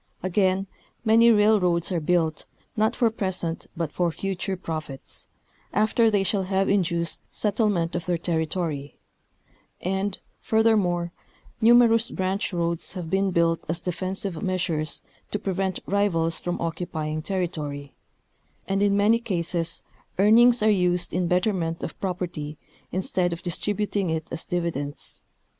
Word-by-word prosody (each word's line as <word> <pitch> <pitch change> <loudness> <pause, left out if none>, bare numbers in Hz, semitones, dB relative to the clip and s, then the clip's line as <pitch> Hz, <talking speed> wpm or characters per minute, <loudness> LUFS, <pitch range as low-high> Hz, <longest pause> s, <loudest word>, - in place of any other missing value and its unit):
Again, 185 +1 +2 0.4
many 230 +1 +6
railroads 205 -6 +3
are 175 - +1
built, 160 -1 0 0.3
not 220 +2 +2
for 235 -3 +2
present 185 -6 -2
but 165 -3 -2
for 175 -2 0
future 190 +3 -3
profits, 155 -6 -5 0.5
after 215 +2 +3
they 205 -2 +2
shall 195 +1 +1
have 190 +1 0
induced 170 -4 +1
settlement 205 -5 0
of 175 +1 -3
their 175 -1 +1
territory; 160 -3 -2 0.8
and, 190 +2 -1 0.2
furthermore, 200 -6 +2 0.5
numerous 230 0 +6
branch 190 +3 -1
roads 170 -1 0
have 175 -3 -6
been 195 0 +2
built 170 -2 +1
as 165 +1 -1
defensive 185 0 -3
measures 175 -5 -1 0.3
to - - -1
prevent 190 -2 -2
rivals 170 -5 +1
from 175 0 -3
occupying 160 -2 -3
territory; 155 -6 -3 0.7
and 195 0 0
in 200 0 +3
many 215 +3 +4
cases 170 -6 -2 0.3
earnings 230 +4 +6
are 215 - +5
used 180 -3 +1
in 180 0 +1
betterment 180 -2 0
of - - -4
propert}' 175 -5 -3 0.3
instead 180 -1 0
of 170 - -8
distributing 200 +1 -1
it 160 0 -1
as 165 - -4
dividends. 170 -5 -3
180 Hz, 130 wpm, -25 LUFS, 170-200 Hz, 0.8 s, many